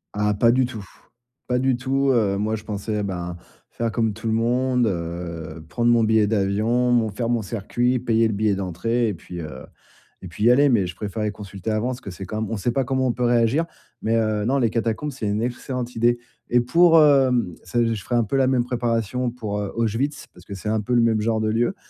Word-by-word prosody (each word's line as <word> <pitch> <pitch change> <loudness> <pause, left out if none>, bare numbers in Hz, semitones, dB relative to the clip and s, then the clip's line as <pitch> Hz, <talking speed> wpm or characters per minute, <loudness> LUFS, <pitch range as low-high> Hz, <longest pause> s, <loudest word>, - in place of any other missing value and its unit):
Ah 105 0 +1
pas 115 +3 +4
du 130 +1 +3
tout. 110 -5 -8 0.6
Pas 125 - +1
du 130 0 +2
tout, 135 +2 0
heu, 105 -6 +2
moi 105 +2 -1
je 110 - -8
pensais 105 0 -3
ben 90 -3 -4 0.4
faire 115 -1 -2
comme 110 -1 0
tout 110 +2 -6
le 110 - +1
monde, 125 +2 +1
heu, 85 -3 -5
prendre 120 +10 +2
mon 120 -1 +4
billet 110 -1 +3
d'avion, 110 +4 +1
mon 115 -2 +3
faire 115 +3 -3
mon 120 -1 +1
circuit, 120 +4 -1
payer 115 -2 +2
le 110 - -2
billet 105 0 +1
d'entrée 105 +6 -1
et - - -2
puis 85 +1 -8
heu 75 -5 -8 0.6
et - - -6
puis 105 +5 -3
y 120 - +7
aller, 140 +3 +5
mais 105 -8 +2
je 90 - -7
préférais 105 0 -3
consulter 100 0 -6
avant 110 +3 0
parce 130 -1 -4
que 100 - -7
c'est 95 +2 -8
quand 110 +4 -4
même 110 - -5
on 115 - -1
sait 100 +5 0
pas 135 +2 0
comment 130 +1 0
on - - +2
peut 125 - -3
réagir, 120 +6 +2 0.4
mais 115 +1 +1
heu, 110 -2 0
non 135 +4 +2
les 120 -3 +2
catacombes 115 +6 -2
c'est 130 -5 -6
une 105 +1 0
excellente 125 +1 -4
idée. 120 +1 +2 0.3
Et 120 0 +5
pour, 165 +7 +5
heu, 130 - +4
s 90 - -13 0.2
je 105 -4 -5
ferai - - -5
un 120 - +3
peu 110 - -3
la 135 - +4
même 130 -2 +2
préparation 120 0 -1
pour 115 -4 -6
Auschwitz 115 +7 -2
parce 90 0 -17
que 100 - -8
c'est 95 +2 -5
un 110 0 +1
peu 115 +4 -3
le 120 - +5
même 115 -2 +2
genre 110 0 0
de 110 - 0
lieu, 120 - +1
115 Hz, 235 wpm, -23 LUFS, 105-125 Hz, 0.6 s, y